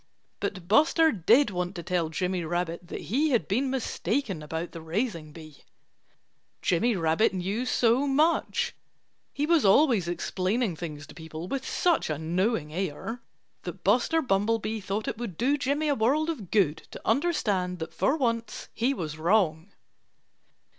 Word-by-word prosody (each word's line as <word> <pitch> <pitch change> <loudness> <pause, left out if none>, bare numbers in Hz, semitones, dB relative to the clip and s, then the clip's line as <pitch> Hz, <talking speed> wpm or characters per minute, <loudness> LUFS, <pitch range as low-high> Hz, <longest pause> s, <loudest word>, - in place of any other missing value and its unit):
But 180 -2 -4
Buster 315 - +4
did 225 - +4
want 180 0 -3
to 170 - -6
tell 175 -2 0
Jimmy 180 +2 -1
Rabbit 175 +1 -3
that - - -6
he 290 +9 +1
had 235 - +1
been 255 +7 0
mistaken 230 - -2
about 160 +3 -4
the 165 - -8
raising 165 -2 -3
bee. 155 -2 -12 1.1
Jimmy 220 +7 +2
Rabbit 165 +4 +2
knew 200 +7 -2
so 245 +4 +3
much 335 - +1 0.6
he 285 - -1
was 330 -1 +3
always 215 - +4
explaining 185 +4 -1
things 155 -2 -7
to - - -13
people 160 0 -8
with 270 +4 -3
such 345 - +1
a 155 - -1
knowing 165 0 -1
air 190 +7 -4 0.4
that 180 +1 -8
Buster 250 - +3
Bumblebee 220 0 0
thought 200 +2 -3
it 225 - -3
would 215 -9 -5
do 270 +4 +2
Jimmy 285 +2 0
a 290 - +3
world 280 +7 +1
of 220 - -8
good 175 -8 +2
to - - -11
understand 215 - +1
that 160 -1 -6
for 195 - +1
once 230 -5 -2
he 255 +5 0
was 155 - -5
wrong. 170 -1 +1
200 Hz, 155 wpm, -27 LUFS, 170-255 Hz, 1.1 s, Buster